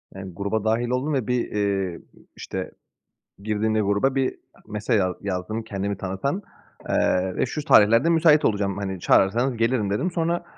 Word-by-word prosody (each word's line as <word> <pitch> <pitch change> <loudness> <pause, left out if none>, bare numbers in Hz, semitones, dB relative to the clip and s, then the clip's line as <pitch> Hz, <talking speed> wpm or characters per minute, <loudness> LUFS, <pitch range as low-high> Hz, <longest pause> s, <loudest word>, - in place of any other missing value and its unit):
Yani, 95 -1 -8
gruba 100 +4 -2
dâhil 115 +2 0
oldum 130 +5 -1
ve 130 -6 -1
bir, 125 -1 -1
eee, 100 -4 -1 0.4
işte, - - -6 0.7
girdiğimde 110 +1 0
gruba 100 +7 +1
bir 135 -1 0 0.3
mesaj 110 +1 0
at 90 -2 -1
yazdım 100 +3 -3
kendimi 100 -2 -3
tanıtan, 95 - -3 0.5
eee 90 0 +1
ve - - +1
şu 150 +4 -5
tarihlerde 115 +9 +5
müsait 160 -2 +4
olacağım, 100 -2 0
hani, 95 -2 -4
çağırırsanız 120 +9 +2
gelirim 115 -2 +1
dedim. 135 - -1
Sonra, 170 0 -1
110 Hz, 155 wpm, -24 LUFS, 100-130 Hz, 0.7 s, tarihlerde